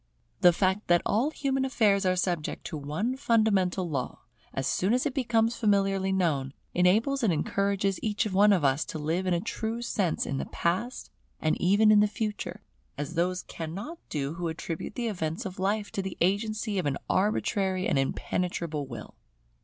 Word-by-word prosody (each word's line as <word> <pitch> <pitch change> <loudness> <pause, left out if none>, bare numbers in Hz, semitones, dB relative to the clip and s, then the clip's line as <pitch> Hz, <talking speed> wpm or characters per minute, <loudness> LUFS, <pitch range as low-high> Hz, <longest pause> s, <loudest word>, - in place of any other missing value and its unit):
The 175 - +7
fact 190 +3 0
that 175 0 +4
all 235 +8 +2
human 270 -3 -1
affairs 210 -7 +2
are 185 - +3
subject 175 -4 -2
to - - -5
one 155 - -2
fundamental 200 -8 +2
law, 135 -6 -3 0.3
as 135 - -3
soon 195 - +2
as 255 - 0
it 285 - 0
becomes 235 -3 +1
familiarly 195 -2 +2
known, 150 -8 0 0.2
enables 220 +10 +3
and 220 -6 +3
encourages 200 +4 0
each 215 0 0
one 205 +1 +4
of 185 -6 +3
us 135 +3 +2
to - - -6
live 165 +5 -1
in 180 - +2
a - - +1
true 225 +5 -3
sense 195 -7 0
in 135 - -2
the - - -4
Past 190 +9 -2 0.3
and 155 - +1
even 205 +4 +5
in 210 - +7
the 210 - +5
Future; 210 0 -4 0.3
as 145 +2 -4
those 180 +2 0
cannot 195 - -6
do 145 -1 -2
who 170 0 -3
attribute 165 +3 -5
the 240 - -2
events 160 -6 -3
of 185 0 -6
life 205 +2 0
to 195 - -2
the 190 -1 -6
agency 210 +2 0
of 175 - -1
an 140 -1 0
arbitrary 190 -1 +1
and 135 - +2
impenetrable 155 +1 -2
Will. 115 -4 -8
190 Hz, 180 wpm, -28 LUFS, 170-215 Hz, 0.3 s, The